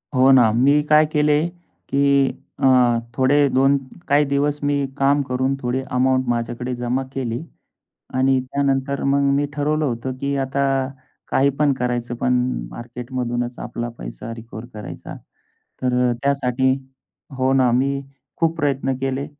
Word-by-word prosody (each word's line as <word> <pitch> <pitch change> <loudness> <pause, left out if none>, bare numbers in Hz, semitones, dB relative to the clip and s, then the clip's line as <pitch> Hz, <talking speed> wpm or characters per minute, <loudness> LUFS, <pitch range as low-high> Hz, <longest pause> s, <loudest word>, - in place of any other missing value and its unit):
हो 130 +1 +6
ना. 120 -5 +6
मी 135 +6 +4
काय 155 0 +6
केले? 150 -1 +2 0.5
की 140 -1 +3 0.4
अ, 125 -3 +4 0.2
थोडे 130 +2 +3
2 135 +2 +3 0.3
काही 145 +1 +4
दिवस 145 +1 +1
मी 145 0 +1 0.2
काम 140 +1 +3
करून 130 +1 -1
थोडी 125 +1 -1 0.2
अमाउंट 130 0 +2
माझ्याकडे 120 +1 -2
जमा 120 +2 -1
केली. 120 -3 -3 0.8
आणि 130 +1 +3
त्यानंतर 140 +1 -1
मग 140 +1 +2 0.2
मी 145 0 +1
ठरवलं 150 +1 0
होतं 125 0 -2
की 140 0 -1
आता 140 +1 -1 0.7
काही 140 +1 +3
पण 145 -2 +3
करायचं. 120 -1 -1
पण 125 +1 0 0.4
मार्केटमधूनच 120 - -4
आपला 120 0 -4
पैसा 115 - -7
रिकव्हर 115 0 -9
करायचा. 105 - -8 0.7
तर 125 -1 +1 0.2
अ, - - +1
त्यासाठी 130 -2 +1 0.7
हो 130 +1 +2
ना. 130 -2 +4
मी 135 +2 +1 0.4
खूप 165 0 +1
प्रयत्न 135 -2 0
केले. 135 +1 -2
130 Hz, 140 wpm, -21 LUFS, 125-140 Hz, 0.8 s, हो